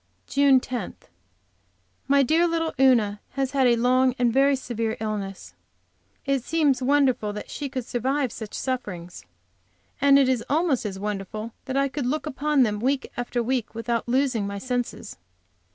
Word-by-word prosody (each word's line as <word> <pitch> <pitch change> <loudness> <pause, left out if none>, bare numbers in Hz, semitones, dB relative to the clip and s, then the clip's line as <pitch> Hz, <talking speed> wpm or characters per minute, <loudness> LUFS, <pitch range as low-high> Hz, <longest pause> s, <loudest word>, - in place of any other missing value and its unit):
JUNE 275 -1 +4
10. 245 -6 -5 1.1
My 280 0 +4
dear 325 +6 +3
little 325 -1 -1
Una 225 -6 +3
has 270 -1 -1
had 270 -2 +3
a 240 - +4
long 255 +2 +3
and 240 -2 +2
very 275 +2 +4
severe 230 -4 -3
illness. 195 - -5 0.7
It 275 -3 0
seems 290 -4 +1
wonderful 255 -6 +2
that 210 - -7
she 285 -2 -4
could 255 -2 -4
survive 260 +2 -1
such 220 -3 -8
sufferings. 185 - -5 0.8
And 280 0 +6
it 275 -2 +4
is 255 -3 +1
almost 295 -6 +1
as 195 -2 -6
wonderful 210 +2 -5
that 265 0 -2
I 275 0 +3
could 275 -2 -3
look 300 +3 -1
upon 295 -1 +1
them, 210 -3 0
week 265 +4 -1
after 240 0 -2
week, 245 -2 -2
without 230 +1 -2
losing 250 -5 +1
my 200 0 -5
senses. 245 +2 -4
255 Hz, 160 wpm, -25 LUFS, 225-275 Hz, 1.1 s, And